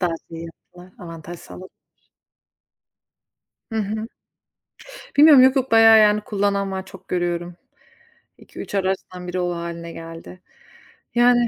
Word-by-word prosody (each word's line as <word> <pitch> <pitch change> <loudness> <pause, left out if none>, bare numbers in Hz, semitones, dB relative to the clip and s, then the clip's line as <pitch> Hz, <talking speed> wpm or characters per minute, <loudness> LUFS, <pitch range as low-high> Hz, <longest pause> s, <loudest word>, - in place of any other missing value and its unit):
Daha 175 -3 0 0.2
şey 165 - -9
yaptılar, 180 +2 -15
avantaj 170 -1 -9
sağladılar. 185 +1 -12 2.0
Hı 225 - -1
hı. 215 +2 -3 1.1
Bilmiyorum, 290 -3 +8
yok 260 +1 +5
yok, 265 -2 0
bayağı 225 -1 +7
yani 210 0 +4
kullanan 200 -1 -1
var, 190 0 -4
çok 190 -1 -14
görüyorum. 175 -1 -2 0.8
2-3 - - -10
araçtan 185 -2 -3
1'i 185 +1 -2
o 175 0 -1
hâline 170 0 -6
geldi. 165 +2 -10 0.8
Yani 240 0 +4
190 Hz, 120 wpm, -21 LUFS, 175-215 Hz, 2.0 s, Bilmiyorum